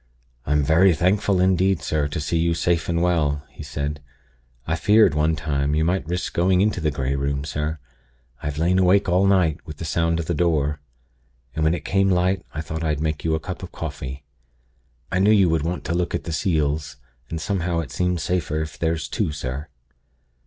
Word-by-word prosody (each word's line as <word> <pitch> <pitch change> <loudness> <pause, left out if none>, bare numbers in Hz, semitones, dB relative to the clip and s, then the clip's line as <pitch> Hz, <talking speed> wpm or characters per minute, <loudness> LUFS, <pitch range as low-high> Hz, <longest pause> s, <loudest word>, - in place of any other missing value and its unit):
'I'm 75 +1 +2
very 85 +4 +4
thankful 95 +3 +2
indeed, 95 -2 +2
sir, 75 -3 0
to 75 +3 -4
see 80 +3 -1
you 85 0 +1
safe 85 0 0
and 85 0 +1
well,' 75 -5 +1
he 65 - -11
said. 75 0 -4 0.6
'I 80 - 0
feared, 105 -1 +5
one 75 +2 +2
time, 70 -1 -1
you 80 +1 +2
might 90 -1 0
risk 90 +1 -3
going 90 +1 +3
into 100 -2 +1
the 80 - +1
Grey 70 -2 -2
Room, 70 +1 -2
sir. 75 +2 -3 0.6
I've 75 0 -4
lain 90 +4 +2
awake 95 +2 +4
all 95 +2 +3
night, 90 -5 +3
with 75 -1 -9
the 85 - -6
sound 85 +1 0
of 85 - -3
the 85 - -1
Door. 75 -3 +1 0.7
And 80 - -1
when 80 +2 +3
it - - -7
came 95 0 +2
light, 90 +1 +1
I 80 - -4
thought 80 +1 -5
I'd 75 -3 0
make 75 -1 -2
you 80 -1 +1
a - - -1
cup 90 +3 -6
of 90 - -8
coffee. 70 -3 -6 0.9
I 90 - +1
knew 100 +2 +4
you 100 -5 +5
would 80 -1 +1
want 85 +4 -3
to - - -1
look 90 0 -1
at - - -3
the 80 - -5
seals, 75 -3 -1 0.3
and 80 - -4
somehow 90 0 -1
it 80 - -8
seems 90 -3 -1
safer 85 -4 -1
if 80 - -9
there's 80 -1 -1
two, - - -1
sir.' 70 +1 -5
80 Hz, 205 wpm, -23 LUFS, 75-90 Hz, 0.9 s, feared